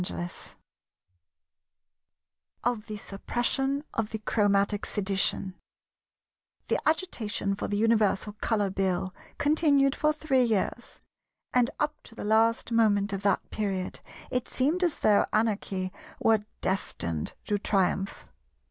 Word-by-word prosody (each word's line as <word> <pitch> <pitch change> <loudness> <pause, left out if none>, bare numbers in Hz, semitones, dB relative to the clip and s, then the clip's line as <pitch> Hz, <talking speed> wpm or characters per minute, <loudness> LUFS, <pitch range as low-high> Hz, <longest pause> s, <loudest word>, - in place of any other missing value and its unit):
§ - - -2
10 175 0 -3 2.3
Of 235 -3 -1
the 215 -1 -5
Suppression 270 +8 -1
of 220 -2 -1
the 220 - -3
Chromatic 205 -1 +1
Sedition 195 -1 0 1.2
The - - +2
agitation 230 - -1
for 195 - -3
the 205 - -1
Universal 215 -2 +2
Colour 205 -4 +1
Bill 185 -1 -1 0.2
continued 285 -2 +4
for 305 - +2
three 300 -4 +1
years; 225 +1 -1 0.5
and 245 -1 +4
up 300 0 -1
to 225 - -14
the - - -6
last 225 +2 +2
moment 205 -3 +3
of 195 - -2
that 200 -1 +1
period 195 -4 -2 0.3
it 250 -1 -1
seemed 310 +8 +1
as 345 -4 +1
though 210 -1 +4
Anarchy 200 -4 0 0.3
were 220 -1 +4 0.2
destined 85 - -2
to 205 -1 0
triumph. 195 -1 0
215 Hz, 120 wpm, -28 LUFS, 195-245 Hz, 2.3 s, continued